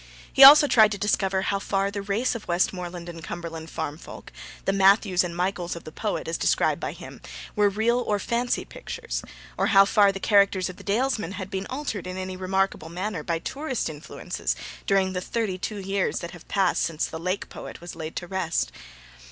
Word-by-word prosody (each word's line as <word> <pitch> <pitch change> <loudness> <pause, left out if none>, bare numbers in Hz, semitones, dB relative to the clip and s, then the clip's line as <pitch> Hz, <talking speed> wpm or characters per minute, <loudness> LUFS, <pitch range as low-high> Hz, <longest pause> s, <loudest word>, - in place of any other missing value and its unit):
He 270 - +7
also 290 +2 +11
tried 220 -6 +5
to - - -4
discover 195 -1 +1
how 200 0 0
far 195 0 -1
the 200 0 -4
race 205 +5 0
of 230 -3 -7
Westmoreland 175 0 -1
and 165 -2 -8
Cumberland 165 -2 -6
farm 160 -1 -4
folk - - -11 0.3
the 195 - +2
'Matthews' 195 -1 +4
and 170 -1 -5
the - - -8
'Michaels' 180 -1 -1
of 170 - -9
the 155 - -9
poet, 210 +5 -3
as 165 - -2
described - - +2
by - - -3
him - - -11 0.3
were 205 -1 +4
real 225 +4 +1
or 210 -4 0
fancy 235 +4 -1
pictures, - - -6 0.4
or - - +2
how 195 -1 +7
far 200 0 +4
the 195 - -6
characters 200 -2 +3
of 185 - -9
the - - -12
Dalesmen 215 -3 0
had 190 -1 -6
been 190 0 -3
altered 255 -9 -4
in 185 0 -5
any 185 0 -4
remarkable 190 -3 -1
manner 180 0 -3
by 165 +2 -1
tourist 265 - -3
influences 150 +1 -4 0.3
during 190 -1 +2
the 180 - -2
thirty 200 -2 -2
two 210 +3 -4
years 195 0 -1
that 170 - -6
have 175 - -13
passed 190 -3 +1
since 160 -2 -1
the 160 - -6
Lake 185 +4 -2
poet - - -9
was 175 0 -9
laid 160 -1 -6
to - - -4
rest. 175 -2 -1
190 Hz, 205 wpm, -25 LUFS, 175-205 Hz, 0.4 s, also